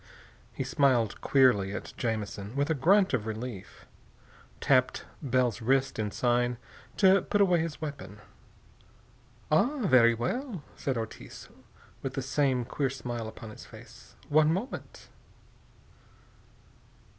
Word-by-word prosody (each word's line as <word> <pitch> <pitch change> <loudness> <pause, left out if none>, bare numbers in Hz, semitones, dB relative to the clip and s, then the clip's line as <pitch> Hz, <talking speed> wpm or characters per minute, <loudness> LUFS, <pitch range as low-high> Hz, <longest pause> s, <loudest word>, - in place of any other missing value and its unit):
He - - -4
smiled 130 -5 +1
queerly 120 -8 +3
as - - -6
Jamison, 110 -2 -4
with 140 +3 0
a - - +4
grunt 185 +7 +3
of 110 -4 -1
relief, 110 -2 -7 0.7
tapped 130 -2 +2 0.2
Bell's 125 -5 0
wrist 135 +2 +1
in 105 -1 -1
sign 120 +2 0 0.4
to 190 -1 +5
put 205 - -1
away 180 -4 +4
his 160 -1 -4
weapon. 140 -10 -7 1.3
"Ah, 250 - +2
very 120 -7 +5
well," 195 - -3
said 135 -3 -2
Ortiz, 110 -1 -8 0.5
with 135 -1 -5
the 135 - -2
same 130 -2 0
queer 135 +2 -1
smile 120 -3 -5
upon 110 0 -9
his - - -12
face. - - -15
"One 155 +1 +4
moment." 195 +10 -5
130 Hz, 120 wpm, -29 LUFS, 115-150 Hz, 1.3 s, to